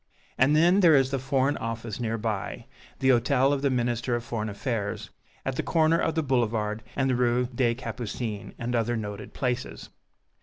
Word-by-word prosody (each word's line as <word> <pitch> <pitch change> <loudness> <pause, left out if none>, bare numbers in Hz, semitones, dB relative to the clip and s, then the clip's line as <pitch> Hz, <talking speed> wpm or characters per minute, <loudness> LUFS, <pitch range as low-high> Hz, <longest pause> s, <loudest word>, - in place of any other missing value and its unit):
And 135 +3 +4
then 175 +5 +5
there 170 -5 +6
is 135 -1 +3
the 135 - 0
Foreign 135 +2 +1
Office 115 -1 -5
near 115 -1 -1
by, 110 -3 -3 0.3
the 130 - +1
Hôtel 130 +2 +3
of 140 - -1
the 140 - +2
Minister 120 -1 0
of 120 - -3
Foreign 110 -2 -3
Affairs 105 0 -3 0.3
at 135 -1 -2
the - - +1
corner 165 0 +2
of 165 - 0
the 160 - +1
Boulevard 115 -5 0
and 135 -1 +1
the 130 - +2
Rue 125 0 +2
des 120 -1 +1
Capucines, 115 -3 -5
and 120 +1 -3
other 120 0 +1
noted 105 -1 -6
places. 125 0 -3
125 Hz, 185 wpm, -27 LUFS, 115-135 Hz, 0.3 s, there